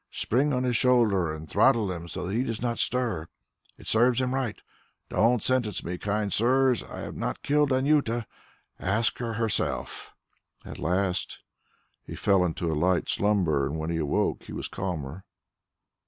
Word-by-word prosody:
Spring 135 +6 +1
on 125 -2 0
his 125 -2 0
shoulder 110 -9 +3
and 80 0 -7
throttle 110 -1 +3
him 85 -1 -6
so 90 +2 -5
that 95 - -3
he 115 - +1
does 115 -4 -3
not 120 0 -2
stir... 120 -10 0 0.5
it - - -15
serves 120 +2 +3
him 130 0 0
right. 130 -5 -2 0.5
Don't 115 +1 +2
sentence 120 -6 +1
me, 90 +1 -4
kind 105 -1 -1
sirs; 130 +2 +3
I - - -8
have - - -6
not - - -4
killed 145 -1 +2
Anjuta. 130 -4 +2 0.5
Ask 110 +4 0
her 115 -2 -3
herself." 115 -1 -2 0.5
At - - -8
last 90 +2 -1 0.6
he - - -8
fell 100 -2 +3
into 85 -1 -1
a - - 0
light 85 +3 +1
slumber, 90 -10 +1
and 75 +3 -4
when 80 +1 -3
he 85 - -1
awoke 75 -3 0
he - - -9
was - - -4
calmer. 85 -2 -5
105 Hz, 170 wpm, -27 LUFS, 90-125 Hz, 0.6 s, shoulder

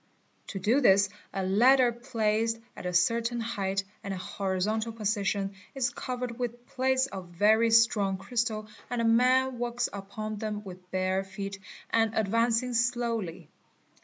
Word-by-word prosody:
'To 195 - -5
do 225 +9 +2
this 200 -4 +5 0.2
a 190 -1 -2
ladder 245 +6 +5
placed 230 -2 0 0.2
at - - -6
a - - -1
cer 185 +7 +3
tain 235 +1 -2
height 195 -4 -1 0.2
and 200 - -4
in - - -6
a - - -7
horizontal 205 +4 -1
position 205 -2 -1 0.2
is 250 -3 0
covered 250 -1 -5
with 240 0 -4
plates 260 +1 +1
of 190 -8 -7
very 215 +6 +3
strong 220 -4 +4
crystal 215 +1 -2 0.2
and 245 - -2
a 230 - +1
man 255 +2 +3
walks 240 0 -1
upon 205 +2 -5
them 210 -1 -4
with 180 -2 -11
bare 185 +1 0
feet 195 0 -6 0.3
and 225 -1 +2
advancing 230 +3 +1
slowly. 230 -8 -1
220 Hz, 155 wpm, -29 LUFS, 195-240 Hz, 0.3 s, this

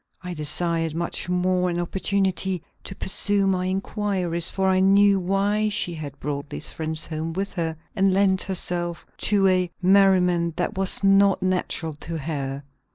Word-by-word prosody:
I 180 0 -5
desired 165 +1 -1
much 170 +1 -3
more 180 0 +1
an 175 0 -2
opportunity 190 0 -1 0.2
to 195 - -6
pursue 200 +1 0
my 185 -1 +1
inquiries, 185 -3 -1
for 190 0 -1
I 190 0 +3
knew 195 +1 +5
why 200 +3 +1
she 205 -4 -1
had 145 -3 -8
brought 145 0 -4
these 155 - -5
friends 160 0 -4
home 160 +1 -4
with 195 +3 -3
her 165 -3 -2 0.2
and 195 -1 +3
lent 190 0 +3
herself 175 -2 -2 0.2
to 200 -2 +4
a 185 -1 +2
merriment 180 -3 +3
that 180 - -2
was 190 +1 0
not 195 -1 +4
natural 180 -3 -1
to 165 +3 -6
her. 140 -2 -4
180 Hz, 160 wpm, -24 LUFS, 165-195 Hz, 0.2 s, knew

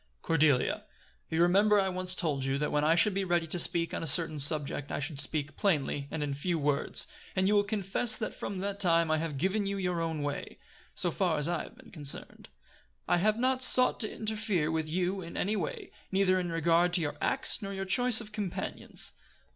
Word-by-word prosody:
"Cordelia 150 -5 +1 0.4
you 160 - -2
remember 205 +4 +4
I 195 - +1
once 185 0 -2
told 150 -7 -1
you 135 +1 -1
that 150 +1 -2
when 150 0 +1
I 160 +2 +3
should 195 +4 +2
be 195 +1 -1
ready 175 -2 0
to 170 +2 -4
speak 170 0 +3
on - - -3
a 165 - -2
certain 155 +1 +3
subject 145 0 0
I - - -2
should 145 0 -4
speak 150 +1 -3
plainly, 145 -7 -1
and 160 - -3
in 145 -1 -3
few 165 +5 -2
words; 145 -1 0 0.3
and 190 0 +1
you 205 - +2
will 205 -1 +4
confess 210 +2 +1
that 215 - -4
from 200 - -6
that 200 0 -4
time 170 -4 +2
I 155 - +1
have 155 -3 -4
given 195 +6 -1
you 200 0 -2
your 180 -3 -2
own 160 -3 -3
way, 145 0 -5 0.4
so 175 - -1
far 175 -3 0
as 150 +1 0
I 170 -2 -1
have - - -15
been 260 -2 -16
concerned. 145 -5 0 0.6
I - - +3
have 215 +4 +1
not 255 +1 0
sought 255 0 +6
to 215 - -1
interfere 210 -7 -2
with 160 -1 -2
you 185 +3 -1
in 170 -1 -8
any 210 +3 0
way, 440 - -5 0.2
neither 190 -1 +2
in 175 -2 -3
regard 170 +2 +2
to 175 - +5
your 145 -2 -3
acts 270 - +1
nor 195 -1 -5
your 195 0 -4
choice 240 +4 +4
of 220 -2 -7
companions. 205 -4 -4
175 Hz, 220 wpm, -29 LUFS, 155-200 Hz, 0.6 s, sought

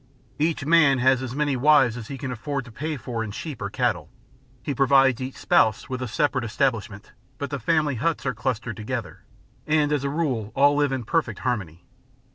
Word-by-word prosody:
Each 150 -3 0
man 155 -4 +5
has 130 0 +3
as 130 -1 -5
many 145 -2 0
wives 130 -3 +4
as 115 -2 -7
he 140 - -6
can 130 0 -5
afford 135 +3 -4
to 120 - -12
pay 150 +6 -4
for 115 -2 -4
in 110 - -5
sheep 140 +6 -7
or 100 - -3
cattle; 110 - -1 0.5
he 145 - -2
provides 135 -1 +4
each 130 +1 -5
spouse 110 -2 +2
with 130 -1 -4
a 125 - -2
separate 130 +2 0
establishment, 115 -4 -2 0.3
but 140 - -5
the 140 - -3
family 150 +3 +1
huts 165 -3 -1
are 130 - 0
clustered 115 -2 -3
together, 110 -2 -5 0.5
and 150 -1 +2
as 145 -2 0
a 140 - -1
rule 135 -9 -2
all 145 +1 +5
live 145 -1 +2
in 130 -2 -2
perfect 120 - -1
harmony. 90 -10 -3
130 Hz, 200 wpm, -24 LUFS, 115-145 Hz, 0.5 s, man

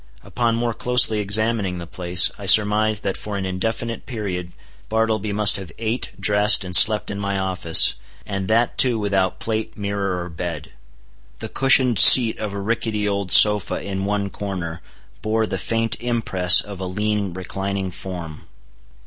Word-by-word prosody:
Upon 120 -2 -2
more 115 0 -3
closely 120 -2 +2
examining 105 -2 0
the 85 - -8
place, 90 +1 +3
I 100 - -8
surmised 110 +1 +3
that 95 - -3
for 105 -1 -7
an 95 - -5
indefinite 110 +5 -5
period 95 -7 -6 0.4
Bartleby 110 -1 -2
must 105 0 +4
have 95 -5 -10
ate, 115 +1 -4
dressed, 105 0 +3
and 90 -1 -1
slept 105 +4 +5
in 100 - -6
my 100 -1 -4
office, 95 -4 +3 0.3
and 100 -2 -5
that 115 +2 -1
too 125 -3 +3
without 100 -3 -2
plate, 110 -1 -5
mirror, 100 -3 -4
or 90 - -9
bed. 85 -1 -8 0.7
The - - -8
cushioned 130 -3 +2
seat 120 -4 +7
of 105 -2 -5
a 100 - -7
rickety 105 0 -3
old 100 -3 -3
sofa 105 +1 +4
in 95 0 -6
one 100 0 -3
corner 90 -5 -7 0.4
bore 110 +1 -1
the - - -5
faint 115 0 -3
impress 110 -7 +3
of 100 -2 -11
a 95 - -5
lean, 105 0 -3
reclining 95 +1 -5
form. 85 -4 -9
100 Hz, 160 wpm, -19 LUFS, 95-110 Hz, 0.7 s, seat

